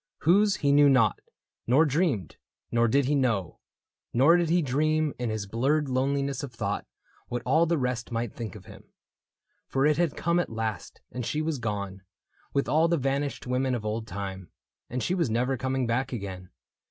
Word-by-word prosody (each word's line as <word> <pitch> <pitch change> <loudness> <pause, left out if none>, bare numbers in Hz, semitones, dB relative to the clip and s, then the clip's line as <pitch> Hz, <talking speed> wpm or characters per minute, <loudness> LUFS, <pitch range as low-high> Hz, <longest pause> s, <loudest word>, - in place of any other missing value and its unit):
Whose 200 +4 +4
he 140 -5 +1
knew 145 0 +6
not, 130 -5 +3 0.5
nor 135 +7 +5
dreamed; 145 - 0 0.3
nor 120 0 +3
did 140 +4 +2
he 145 - +1
know. 115 - 0 0.5
Nor 140 +8 +6
did 175 -2 +1
he 175 0 +3
dream, 155 +3 +1
in 120 -2 -1
his 110 -2 -3
blurred 135 +8 0
loneliness 140 +2 0
Of 140 -3 -6
thought, 105 -3 -3 0.4
what 120 -1 -4
all 160 +6 +3
the 170 0 +1
rest 125 -3 -2
might 115 -1 -2
think 110 -6 -6
of - - -12
him. - - -13 0.8
For 135 +1 +1
it 150 0 +3
had 170 -4 0
come 170 +1 +1
at 175 - -1
last, 110 -1 -4
and 125 - -4
she 150 - -2
was 155 -3 -1
gone 100 -4 -4 0.5
With 140 - 0
all 155 +6 +3
the 170 0 +2
vanished 140 +1 -2
women 125 +1 0
of 110 -3 -5
old 110 +1 -3
time, 95 -3 -6 0.2
— - - -61
And 125 0 -3
she 180 - 0
was 170 -8 +1
never 125 +4 +1
coming 130 +1 -1
back 125 +3 -1
again. 95 -6 -6
130 Hz, 190 wpm, -27 LUFS, 115-150 Hz, 0.8 s, knew